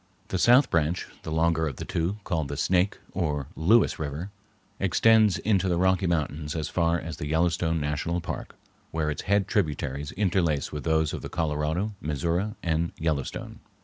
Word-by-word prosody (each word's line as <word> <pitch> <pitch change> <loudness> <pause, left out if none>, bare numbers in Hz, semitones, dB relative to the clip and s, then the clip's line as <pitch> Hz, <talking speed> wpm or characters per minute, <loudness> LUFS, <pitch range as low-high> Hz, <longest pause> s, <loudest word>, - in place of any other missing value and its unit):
The 95 - -1
south 125 +7 +5
branch, 85 +1 +1 0.2
the 80 - -6
longer 80 0 +2
of 70 - -4
the - - -6
two, 85 +5 -1
called 80 -6 -1
the 70 0 -5
Snake, 90 +4 +2
or 75 -6 -1
Lewis, 105 +9 +3
River, 80 +6 -4 0.5
extends 110 +2 +4
into 95 -3 +1
the 85 - +1
Rocky 95 +1 +2
Mountains 75 -2 -1
as 80 -2 -2
far 85 0 +1
as 80 -1 -6
the 75 - -4
Yellowstone 80 +1 +1
National 75 +4 -1
Park, 85 - -6 0.3
where 80 -2 -1
its 75 - -4
head 100 -1 +3
tributaries 75 -6 -1
interlace 85 -8 +1
with 75 -1 -5
those 80 -1 +2
of - - -4
the - - -6
Colorado, 80 +6 -1
Missouri, 85 - -1
and 85 0 0
Yellowstone. 80 -4 -3
85 Hz, 170 wpm, -27 LUFS, 75-95 Hz, 0.5 s, south